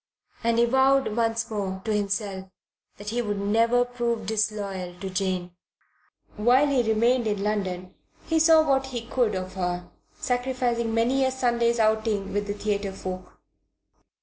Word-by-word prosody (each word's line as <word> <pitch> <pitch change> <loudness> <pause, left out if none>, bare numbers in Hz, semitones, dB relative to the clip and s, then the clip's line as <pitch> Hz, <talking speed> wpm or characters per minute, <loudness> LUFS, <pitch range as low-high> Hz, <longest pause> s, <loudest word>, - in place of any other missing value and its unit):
And 230 0 +2
he 235 - +5
vowed 265 -1 +3
once 230 -1 0
more, 195 -3 -3
to 220 - 0
himself, 200 -2 -2 0.5
that 205 +1 -6
he 240 +2 -1
would 205 -3 -2
never 230 +4 +3
prove 240 -2 -2
disloyal 200 -4 -2
to 190 0 -5
Jane. 185 -1 -2 0.9
While 245 +6 +4
he 280 -3 +2
remained 230 +2 +2
in 205 -2 -1
London 185 -3 -2 0.3
he 325 -1 +1
saw 320 0 +6
what 270 -1 +2
he 240 -3 -5
could 240 -4 0
of 185 0 -4
her, 180 -1 -3 0.3
sacrificing 245 -2 -1
many 250 +4 +2
a 260 - +3
Sunday's 240 -2 +1
outing 220 -2 +1
with 205 0 -1
the 205 - -3
theatre 205 -1 -2
folk. 185 -1 -7
220 Hz, 150 wpm, -25 LUFS, 200-245 Hz, 0.9 s, saw